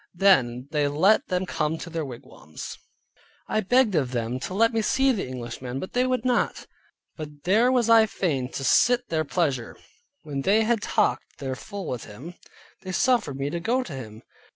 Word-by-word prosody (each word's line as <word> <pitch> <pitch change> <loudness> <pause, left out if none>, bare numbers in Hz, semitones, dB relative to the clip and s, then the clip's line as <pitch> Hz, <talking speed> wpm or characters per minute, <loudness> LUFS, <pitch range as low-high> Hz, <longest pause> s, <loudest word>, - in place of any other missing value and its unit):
Then 130 -10 +3
they 150 -2 +1
let 185 +10 +3
them 180 0 -1
come 160 -3 -1
to 170 - -8
their 165 -1 -2
wigwams. 120 - -9 0.7
I - - 0
begged 235 +2 +3
of 140 -7 +1
them 120 +1 -2
to 140 +7 -5
let 230 +3 +3
me 225 - +1
see 265 +5 +2
the 215 - -2
Englishman, 125 +1 -6
but 185 - -7
they 250 +1 +2
would 255 -1 -1
not. 250 -2 0 0.5
But 150 -2 -9
there 220 +7 +4
was 245 -3 +2
I 225 -1 +6
fain 140 -11 -2
to 135 - -4
sit 245 - +3
their 160 -1 0
pleasure. 140 -6 -1 0.5
When 140 -2 -4
they 210 +9 +3
had 225 -1 +1
talked - - 0
their 135 -2 -4
fill 200 +9 -7
with 125 -2 -4
him, 135 +12 -10 0.5
they 185 - -6
suffered 230 - +1
me 140 +1 -2
to 170 - -2
go 245 +8 0
to 170 - -8
him. 110 -4 -9
170 Hz, 190 wpm, -25 LUFS, 135-220 Hz, 0.7 s, I